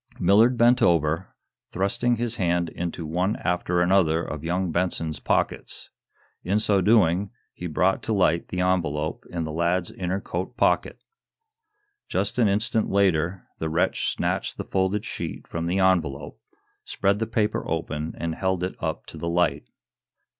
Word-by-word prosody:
Millard 110 Hz, +7 st, +4 dB
bent 120 Hz, +2 st, +4 dB
over, 80 Hz, +1 st, +1 dB, 0.4 s
thrusting 100 Hz, +6 st, +1 dB
his 120 Hz, 0 st, -2 dB
hand 85 Hz, -2 st, +1 dB
into 85 Hz, -1 st, -5 dB
one 90 Hz, +6 st, 0 dB
after 90 Hz, 0 st, 0 dB
another 85 Hz, -3 st, +3 dB
of 75 Hz, -1 st, -6 dB
young 90 Hz, +1 st, -1 dB
Benson's 85 Hz, -2 st, -1 dB
pockets. -, -, -2 dB, 0.5 s
In 95 Hz, +4 st, +1 dB
so 105 Hz, -2 st, +2 dB
doing 100 Hz, -2 st, +3 dB, 0.2 s
he 90 Hz, -, -6 dB
brought 90 Hz, +4 st, +1 dB
to 110 Hz, -, -2 dB
light 85 Hz, -4 st, +2 dB
the 90 Hz, -, -2 dB
envelope 80 Hz, -5 st, -1 dB
in 85 Hz, -2 st, -3 dB
the 80 Hz, -, -4 dB
lad's 85 Hz, +2 st, 0 dB
inner 90 Hz, +1 st, -2 dB
coat 95 Hz, +6 st, -5 dB
pocket. -, -, +1 dB, 1.1 s
Just -, -, -1 dB
an 115 Hz, -, +5 dB
instant 110 Hz, +3 st, +1 dB
later, 90 Hz, -2 st, +1 dB
the 80 Hz, -, -2 dB
wretch 80 Hz, +2 st, 0 dB
snatched -, -, -2 dB
the -, -, -3 dB
folded 95 Hz, +2 st, 0 dB
sheet -, -, -5 dB
from 85 Hz, 0 st, -4 dB
the 90 Hz, +2 st, 0 dB
envelope, 80 Hz, -7 st, +1 dB, 0.4 s
spread 100 Hz, +1 st, 0 dB
the 110 Hz, -, -1 dB
paper 110 Hz, -1 st, 0 dB
open 80 Hz, -1 st, -3 dB
and 85 Hz, -1 st, -2 dB
held 95 Hz, 0 st, -1 dB
it 90 Hz, -, -2 dB
up 80 Hz, -1 st, -3 dB
to -, -, -10 dB
the 85 Hz, -, -2 dB
light. 90 Hz, +1 st, 0 dB
90 Hz, 155 wpm, -25 LUFS, 85-100 Hz, 1.1 s, an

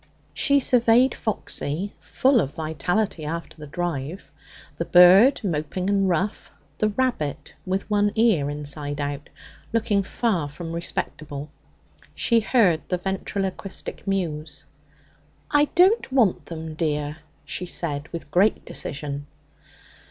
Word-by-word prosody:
She 280 Hz, -1 st, +3 dB
surveyed 245 Hz, 0 st, +4 dB
Foxy, 195 Hz, -4 st, -3 dB
full 265 Hz, -3 st, +2 dB
of 140 Hz, -, -4 dB
vitality 160 Hz, +4 st, -1 dB
after 165 Hz, +3 st, -5 dB
the 150 Hz, -2 st, -10 dB
drive; 155 Hz, -1 st, -4 dB, 0.5 s
the 170 Hz, -, -2 dB
bird, 185 Hz, +10 st, +7 dB
moping 180 Hz, +2 st, -1 dB
and 195 Hz, -1 st, +2 dB
rough; 185 Hz, +4 st, -1 dB, 0.3 s
the 215 Hz, -, +2 dB
rabbit, 200 Hz, -, -2 dB
with 190 Hz, +1 st, -1 dB
one 205 Hz, -1 st, +2 dB
ear 215 Hz, -11 st, +3 dB
inside 145 Hz, 0 st, -4 dB
out, 145 Hz, 0 st, -4 dB, 0.4 s
looking 220 Hz, -3 st, +2 dB
far 190 Hz, -6 st, -1 dB
from 165 Hz, +3 st, -7 dB
respectable. 155 Hz, -3 st, -4 dB, 0.6 s
She 235 Hz, -1 st, +3 dB
heard 210 Hz, -8 st, +3 dB
the 180 Hz, -, +1 dB
ventriloquistic 195 Hz, +1 st, -4 dB
mews. 160 Hz, -6 st, -3 dB, 0.9 s
'I 290 Hz, 0 st, +5 dB
don't 375 Hz, -, +4 dB
want 240 Hz, -8 st, +2 dB
them, 160 Hz, -1 st, -6 dB
dear,' 150 Hz, -2 st, -2 dB, 0.3 s
she 180 Hz, -, -4 dB
said 155 Hz, -4 st, -3 dB
with 165 Hz, -3 st, -8 dB
great 195 Hz, +6 st, +3 dB
decision. 145 Hz, 0 st, -5 dB
175 Hz, 120 wpm, -24 LUFS, 150-210 Hz, 0.9 s, bird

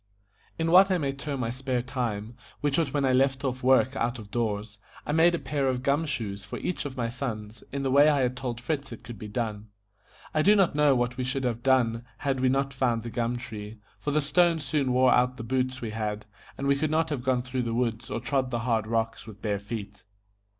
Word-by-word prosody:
In 165 Hz, 0 st, 0 dB
what 190 Hz, +2 st, +8 dB
I 185 Hz, -, +3 dB
may 140 Hz, -5 st, -1 dB
term 140 Hz, 0 st, -4 dB
my 115 Hz, -1 st, -1 dB
spare 130 Hz, -1 st, -2 dB
time, 115 Hz, -3 st, -3 dB, 0.3 s
which 145 Hz, -2 st, +1 dB
was 160 Hz, -4 st, +1 dB
when 140 Hz, -1 st, +1 dB
I 130 Hz, -, +3 dB
left 135 Hz, +1 st, +2 dB
off 130 Hz, -1 st, -2 dB
work 130 Hz, +1 st, +4 dB
out 120 Hz, 0 st, -1 dB
of 105 Hz, -3 st, -11 dB
doors, 105 Hz, -2 st, -2 dB, 0.3 s
I -, -, -2 dB
made 165 Hz, +3 st, +5 dB
a -, -, -1 dB
pair 145 Hz, -4 st, -1 dB
of 130 Hz, -1 st, -1 dB
gum 145 Hz, +4 st, +1 dB
shoes 105 Hz, -8 st, -3 dB
for 105 Hz, -, -6 dB
each 180 Hz, -, -3 dB
of 135 Hz, -2 st, -6 dB
my 120 Hz, -2 st, 0 dB
sons, 115 Hz, -3 st, -5 dB
in 140 Hz, 0 st, -3 dB
the 135 Hz, -, 0 dB
way 145 Hz, +3 st, +7 dB
I 145 Hz, -2 st, +3 dB
had 125 Hz, 0 st, 0 dB
told 125 Hz, -2 st, -4 dB
Fritz 140 Hz, +1 st, -3 dB
it 115 Hz, -, -9 dB
could 120 Hz, -4 st, -9 dB
be 105 Hz, -, -6 dB
done. 105 Hz, -1 st, -3 dB, 0.7 s
I 155 Hz, -, +3 dB
do 205 Hz, +6 st, +6 dB
not 195 Hz, -4 st, +3 dB
know 145 Hz, -2 st, +4 dB
what 120 Hz, 0 st, 0 dB
we 130 Hz, -, -1 dB
should 130 Hz, +2 st, -2 dB
have 120 Hz, -2 st, -1 dB
done 120 Hz, -3 st, +2 dB
had 135 Hz, -1 st, -1 dB
we 130 Hz, 0 st, +3 dB
not 135 Hz, +1 st, 0 dB
found 120 Hz, -4 st, 0 dB
the 120 Hz, -, -6 dB
gum 120 Hz, +1 st, -1 dB
tree, 110 Hz, -3 st, -7 dB, 0.2 s
for 145 Hz, -, -3 dB
the 150 Hz, +1 st, +2 dB
stones 165 Hz, +1 st, +2 dB
soon 135 Hz, -2 st, 0 dB
wore 125 Hz, 0 st, +5 dB
out 125 Hz, +1 st, +2 dB
the 115 Hz, -, -6 dB
boots 130 Hz, +2 st, -1 dB
we 115 Hz, -2 st, -4 dB
had, 105 Hz, -1 st, -3 dB, 0.3 s
and 140 Hz, -, -3 dB
we 140 Hz, 0 st, +4 dB
could 155 Hz, +2 st, 0 dB
not 160 Hz, +1 st, +1 dB
have 140 Hz, -4 st, -1 dB
gone 130 Hz, -2 st, +1 dB
through 125 Hz, 0 st, -2 dB
the 115 Hz, -1 st, -2 dB
woods 120 Hz, -1 st, -1 dB
or -, -, -2 dB
trod 130 Hz, +1 st, 0 dB
the 120 Hz, -2 st, -2 dB
hard 115 Hz, -2 st, 0 dB
rocks 115 Hz, 0 st, -1 dB
with 105 Hz, -2 st, -10 dB
bare 105 Hz, -3 st, -1 dB
feet. 100 Hz, -1 st, -7 dB
125 Hz, 245 wpm, -27 LUFS, 115-140 Hz, 0.7 s, what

